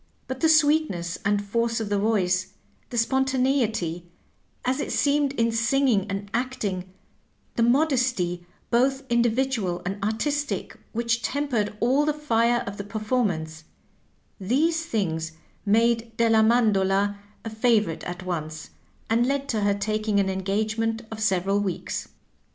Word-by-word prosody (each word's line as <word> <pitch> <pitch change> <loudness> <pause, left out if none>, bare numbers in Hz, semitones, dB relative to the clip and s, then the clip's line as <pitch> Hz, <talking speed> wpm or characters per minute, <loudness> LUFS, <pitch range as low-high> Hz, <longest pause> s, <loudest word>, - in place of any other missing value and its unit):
But 260 0 -5
the 320 - +3
sweetness 295 - +2
and 205 0 +1
force 230 +2 0
of 220 -2 -3
the 205 -1 +1
voice; 190 -4 +1 0.4
the 240 - -5
spontaneity, 240 - 0 0.6
as 255 +2 +1
it 290 - -3
seemed, 285 -1 +2
in 230 -3 +1
singing 230 -2 +2
and 195 +1 -4
acting; 205 -7 -2 0.7
the - - 0
modesty, 245 - +2 0.3
both 265 +3 +2
individual 235 -5 +1
and 195 +2 -4
artistic, 285 +8 -2 0.2
which 235 +1 0
tempered 240 -8 -1
all 260 +5 +3
the 300 - +1
fire 240 -5 +1
of 200 0 -6
the 200 - -4
performance; 200 -8 -2 0.7
these 310 - +1
things 165 - -2 0.3
made 230 +1 +2
Delia 225 -1 +4
Mandola 205 -3 +2 0.3
a 225 - -4
favorite 220 -6 +1
at 180 +1 -6
once, 160 -3 -5 0.4
and 235 +2 +2
led 275 0 -1
to 220 -3 0
her 200 0 +2
taking 215 0 0
an 190 -1 +1
engagement 220 +4 -1
of 220 - -6
several 195 -2 +1
weeks. 195 -3 -3
225 Hz, 135 wpm, -25 LUFS, 195-255 Hz, 0.7 s, Delia